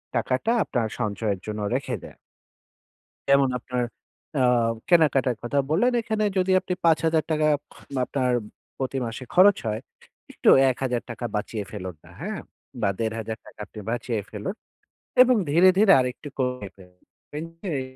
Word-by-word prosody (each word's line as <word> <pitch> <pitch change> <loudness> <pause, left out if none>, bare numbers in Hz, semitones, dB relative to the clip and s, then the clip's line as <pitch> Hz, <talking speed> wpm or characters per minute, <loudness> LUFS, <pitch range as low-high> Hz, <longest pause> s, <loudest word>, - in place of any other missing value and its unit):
টাকাটা 130 - 0
আপনার 115 -3 -1
সঞ্চয়ের 105 -2 -1
জন্য 105 -1 -4
রেখে 130 -1 -2
দেয়া। - - -12 1.1
যেমন, 140 -1 +5
আপনার 125 0 -2 0.5
অ্যা 130 - +3 0.4
কেনাকাটার 140 - +4
কথা 120 +4 -1
বললেন, 230 +11 +3
এখানে 215 -1 -1
যদি 185 0 +2
আপনি 185 -1 -3
৳৫০০০ 160 -1 +2 0.6
আপনার 130 -2 0 0.5
প্রতি 135 0 -2
মাসে 115 +3 -6
খরচ 195 +2 +7
হয়, 110 0 -1 0.5
একটু - - +3 0.2
৳১০০০ 120 -2 -3
বাঁচিয়ে 105 0 -3
ফেলুন 95 -4 -6
না, - - -16
হ্যাঁ? - - -4 0.4
বা - - +3
৳১৫০০ 110 0 -4
আপনি 105 - -10
বাঁচিয়ে 120 -1 -2
ফেলুন। 105 - -4 0.7
এবং 255 -1 +4
ধীরে, 170 +5 +6
ধীরে 205 -1 +7
আরেকটু 125 +3 -4
কমিয়ে 125 -6 -2
ফেলুন। 90 -1 -18 0.2
দেখবেন 150 +2 -8 0.3
এর 135 - -1
130 Hz, 135 wpm, -25 LUFS, 110-160 Hz, 1.1 s, খরচ